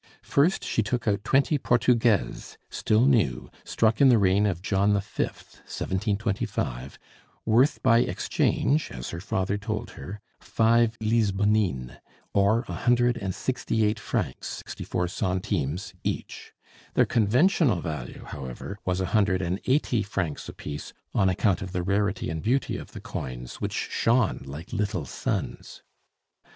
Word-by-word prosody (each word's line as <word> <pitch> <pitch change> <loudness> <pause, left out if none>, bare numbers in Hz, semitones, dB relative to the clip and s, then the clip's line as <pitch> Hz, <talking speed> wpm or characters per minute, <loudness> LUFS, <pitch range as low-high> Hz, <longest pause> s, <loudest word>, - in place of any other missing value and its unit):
First 155 +7 +2
she - - 0
took 115 +2 -2
out 100 -1 +1
twenty 140 +5 +2
portugaises, 120 -4 +1
still 110 +3 +2
new, 105 - +2
struck 110 +1 +1
in 135 - +8
the 120 - +6
reign 100 +1 +3
of 90 -3 -2
John 100 0 +2
V., - - +3 0.3
1725, 95 - -3 0.5
worth 120 +6 +3
by 115 +1 +5
exchange, 150 +4 +1
as 65 -1 -6
her 85 - -5
father 95 0 -1
told 100 - -4
her, 95 +10 -8 0.2
five 115 0 +2
lisbonnines, 105 - +1 0.3
or 105 +5 +3
a - - -5
hundred 120 0 +2
and 95 -2 -3
sixty 115 -4 0
eight 105 +1 0
francs, - - -3
sixty - - -8
four 90 0 -1
centimes 90 -1 -2
each; - - -4 0.4
their - - +5
conventional 125 - +3
value, 75 -7 -6
however, 70 +9 -7
was 90 0 -1
a - - 0
hundred 100 -4 +3
and 90 +3 -1
eighty 130 -4 +2
francs 95 -6 -3
apiece, 75 0 -7 0.2
on 95 - +3
account 95 +2 +1
of 95 -2 -6
the 90 -1 -1
rarity 100 +2 0
and 80 -1 -3
beauty 130 +6 0
of - - -8
the - - -8
coins, 60 -1 -6
which - - -2
shone 115 -2 +1
like 75 - -8
little 105 -7 -1
suns. - - -4
105 Hz, 140 wpm, -26 LUFS, 90-115 Hz, 0.5 s, in